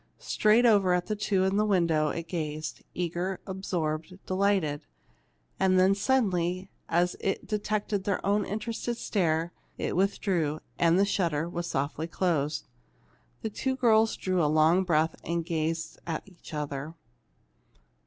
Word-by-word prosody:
Straight 215 +3 +3
over 200 -5 +5
at 180 0 -1
the 215 - -2
two 205 -2 +1
in 190 +1 +1
the 210 - +3
window 170 -7 +2
it 165 +2 -4
gazed, 155 -3 -4
eager, 180 +2 -2
absorbed, 180 -3 -3
delighted. 185 -6 +1 0.8
And 185 -1 +4
then 190 +1 +5
suddenly, 190 -5 0 0.2
as 175 +2 +2
it 195 - -2
detected 210 -1 -1
their 200 - -1
own 205 +1 +2
interested 230 +3 -3
stare, 170 -6 0 0.3
it - - -2
withdrew, 180 -5 +1 0.2
and 170 0 +4
the 200 - +4
shutter 170 -6 0
was 175 0 -4
softly 145 +3 -2
closed. 155 -4 0 0.8
The 220 - -2
two 260 +5 -1
girls 225 -3 +3
drew 185 -2 0
a 150 - +3
long 160 +4 +4
breath 160 -1 +2
and 170 0 -2
gazed 160 -1 -2
at 160 -2 -2
each 180 -3 -14
other. 150 0 -4
180 Hz, 145 wpm, -28 LUFS, 160-200 Hz, 0.8 s, over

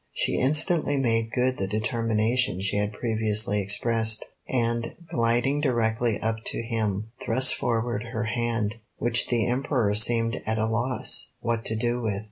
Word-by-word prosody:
She - - 0
instantly 150 +2 +3
made 115 -3 0
good 130 +2 0
the 95 - -1
determination 110 +1 0
she 95 +1 -1
had 105 0 0
previously 110 -2 +1
expressed, 110 +2 +1 0.2
and, 115 -2 -1 0.2
gliding 120 +2 +1
directly 115 -4 0
up 110 0 -1
to - - -2
him, 110 -2 -2
thrust 130 +3 +5
forward 120 -1 -2
her 115 -1 -4
hand, 115 -1 -2 0.2
which 120 0 0
the 120 -2 +1
Emperor 125 -4 0
seemed 115 +2 +2
at 110 0 -2
a 110 - +1
loss 120 +3 0
what 115 -1 -2
to 110 - +1
do 120 +2 -1
with. 105 -4 -2
115 Hz, 150 wpm, -25 LUFS, 110-120 Hz, 0.2 s, thrust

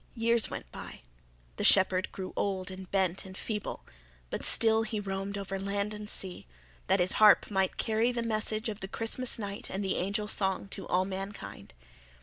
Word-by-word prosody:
Years 230 -1 +3
went - - -7
by; - - -9 0.6
the - - -2
shepherd 185 0 +5
grew 185 -1 -6
old 190 -1 -1
and 185 0 -8
bent 190 -2 +1
and 190 0 -9
feeble; 210 -2 -4 0.5
but - - -3
still 225 -1 +4
he 220 -1 -2
roamed 195 0 -3
over 195 -1 -4
land 200 +2 -1
and 210 0 -6
sea, 185 - -4 0.4
that - - +3
his 180 +1 +2
harp 210 0 +7
might 190 -1 +1
carry 225 +2 +2
the 240 -1 -2
message 215 0 -1
of 215 -2 -4
the 190 - -5
Christmas 225 +4 +1
night 200 -2 -5
and 195 +2 -2
the 190 - 0
angel 200 +3 0
song 190 -2 0
to 195 - -5
all 185 +1 +2
mankind. 195 - -6
200 Hz, 180 wpm, -30 LUFS, 190-215 Hz, 0.6 s, harp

